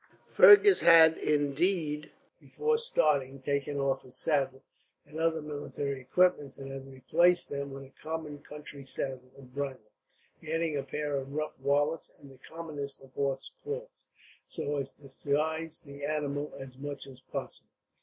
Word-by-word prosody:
Fergus 410 -1 +9
had 160 -1 +8
indeed, 150 +1 0 0.3
before 455 0 0
starting, 145 - +2
taken 140 +1 -2
off 135 -1 0
his 130 0 -8
saddle 135 -4 0 0.4
and 155 - -8
other 160 -1 +1
military 145 -2 -4
equipments; 145 0 +2
and 135 0 -7
had 135 0 -8
replaced 170 +7 +3
them 140 0 -3
with 135 0 -8
a 135 - -16
common 155 -2 -5
country 145 -1 -10
saddle 130 -1 -4
and 130 -2 -15
bridle, 135 -5 -5 0.5
adding 160 0 -1
a 140 - 0
pair 145 +2 -3
of 135 +1 -5
rough 155 -1 -3
wallets 145 +3 +1
and 140 -1 -14
the 130 - -17
commonest 150 -3 -6
of 130 -1 -17
horse 135 -1 -2
cloths, 475 +3 -7 0.4
so 145 0 -3
as 135 -1 -3
to 145 - -25
disguise 155 +4 -2
the 140 0 -10
animal 145 -1 -2
as 130 -1 -9
much 145 -1 -5
as 130 -2 -13
possible. - - -6
145 Hz, 155 wpm, -30 LUFS, 135-160 Hz, 0.5 s, Fergus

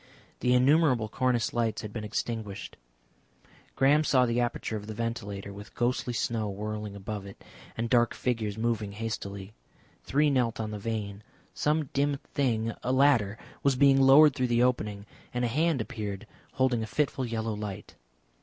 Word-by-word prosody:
The 125 0 +3
innumerable 130 -3 +4
cornice 125 +1 0
lights 115 -2 -1
had 105 -1 -7
been 110 - -4
extinguished. 105 -1 -4 1.0
Graham 145 +3 +4
saw 130 -4 +4
the 120 0 0
aperture 120 -2 -2
of 105 -1 -6
the 110 - -6
ventilator 105 -4 -4
with 100 +1 -11
ghostly 125 +1 0
snow 110 -1 -1
whirling 105 +1 -5
above 100 0 -6
it 95 - -13 0.3
and 115 +1 -1
dark 120 -1 +3
figures 110 -4 -2
moving 110 -3 -1
hastily. 100 -2 -5 0.5
Three 145 +2 +2
knelt 120 -4 +1
on 110 -1 -3
the 105 - -5
vane. 105 -2 -4 0.3
Some 150 -1 0
dim 140 0 +1 0.2
thing 115 -5 0
a 125 - -1
ladder 130 -7 +3 0.2
was 140 -2 +2
being 135 0 +5
lowered 140 +2 +7
through 130 -3 0
the 120 0 +3
opening, 105 -5 0 0.3
and 125 0 +1
a - - 0
hand 155 +1 +1
appeared 105 -1 -5 0.3
holding 130 -3 +1
a 110 - -3
fitful 135 +3 -1
yellow 110 -1 -2
light. 105 -2 -6
115 Hz, 165 wpm, -28 LUFS, 105-130 Hz, 1.0 s, lowered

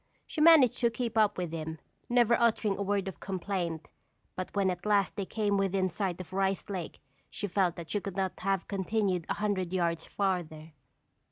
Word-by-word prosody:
She 310 - -4
managed 305 -7 +7
to 235 - +3
keep 235 -1 -3
up 215 -2 +3
with 175 -3 -3
him, 160 0 -4 0.3
never 240 -1 +4
uttering 220 -3 +2
a - - -5
word 200 -1 0
of 190 - -6
complaint, 180 -4 -3 0.4
but 185 - -4
when 195 -2 +2
at 180 0 -6
last 205 -3 +2
they 195 -2 -3
came 210 -2 0
within 195 -1 +1
sight 185 0 -2
of 185 0 -8
Rice 195 +1 0
Lake 180 -4 -5 0.3
she - - -5
felt 185 -2 +1
that 170 -2 -8
she 205 - 0
could 195 -2 -6
not 190 -1 -1
have 195 -1 -1
continued 195 -3 -1
a - - 0
hundred 195 -4 -1
yards 170 -3 -1
farther. 170 -5 -2
195 Hz, 190 wpm, -30 LUFS, 180-205 Hz, 0.4 s, managed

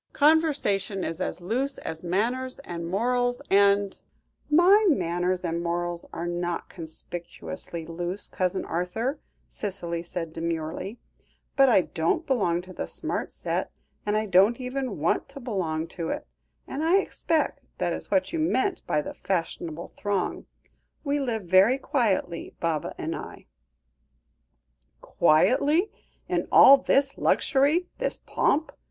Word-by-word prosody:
Conversation 285 - +2
is 165 +2 -4
as - - -3
loose 260 +9 -1
as 160 +1 -6
manners 240 +9 0
and 170 -1 -5
morals, 245 +6 +1
and 200 0 +4 0.3
" - - -42
"My 375 +7 +6
manners 180 - 0
and 170 -1 -2
morals 175 0 -2
are 170 - -4
not 175 0 -3
conspicuously 170 0 -7
loose, 175 +4 -2
Cousin 185 0 -1
Arthur," 200 - -2 0.3
Cicely 175 -5 -4
said 170 -1 -5
demurely; 165 +5 -3 0.6
"but 270 -1 +6
I 220 - +6
don't 175 - -1
belong 180 - +1
to 185 0 -11
the - - -4
smart - - -2
set, - - -2 0.3
and 210 0 0
I 215 - 0
don't 200 +5 +4
even 255 -3 -3
want 160 - 0
to 275 0 -8
belong 180 -10 -2
to 170 -2 -4
it, - - -3 0.4
and 285 +3 -4
I 340 +4 +5
expect 330 -4 0 0.2
that - - 0
is - - -6
what 285 +3 +1
you 330 - -1
meant 315 +4 +1
by 150 - +1
the - - -6
fashionable 170 -3 -3
throng. 200 -2 -2 0.6
We 290 -1 0
live 235 -6 -2
very 190 +8 +5
quietly, 210 - -1
Baba 165 -3 -2
and - - -3
I." - - -9 1.5
"Quietly? 280 - +3 0.4
In - - -1
all 275 +1 +9
this 275 +1 +1
luxury, 290 +6 +3
this - - -1
pomp?" 310 +3 0
195 Hz, 135 wpm, -26 LUFS, 175-270 Hz, 1.5 s, all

